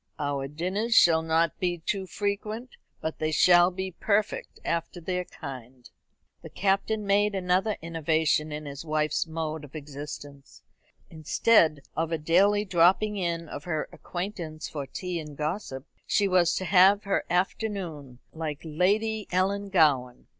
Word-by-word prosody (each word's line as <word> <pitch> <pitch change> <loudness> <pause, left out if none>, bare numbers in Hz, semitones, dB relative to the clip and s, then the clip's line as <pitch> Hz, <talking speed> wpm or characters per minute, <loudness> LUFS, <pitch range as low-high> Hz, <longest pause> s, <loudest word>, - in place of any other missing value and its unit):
Our 145 -2 -2
dinners 185 - -1
shall 165 -5 +6
not 160 0 +1
be 175 -1 0
too 190 +3 -3
frequent, 210 +5 -3 0.3
but 160 - -4
they 155 - 0
shall 175 +2 +6
be 190 +1 -5
perfect 205 +3 -1
after 170 +1 -2
their 180 +1 -3
kind." 130 -5 -10 0.5
The - - -10
Captain 200 +2 0
made 205 +1 +2
another 190 +3 +1
innovation 160 -2 +1
in 150 0 -5
his 140 0 -7
wife's 155 +1 0
mode 160 -1 -4
of 145 +1 -12
existence. 145 -1 -9 0.5
Instead 155 0 +3
of 165 +1 -1
a 165 - +1
daily 195 +7 +3
dropping 190 +3 +3
in 170 -3 -2
of 145 - -8
her 160 -3 -2
acquaintance 175 -4 -6
for 145 -4 -6
tea 180 +2 -4
and 150 -3 -9
gossip, 150 -4 -4 0.2
she 205 - +2
was 180 -3 +3
to 185 - -2
have 195 +2 +5
her 200 - 0
afternoon, 180 - -2 0.2
like 155 -3 -4
Lady 205 +7 0
Ellangowan. 180 -10 +1
170 Hz, 140 wpm, -27 LUFS, 155-195 Hz, 0.5 s, shall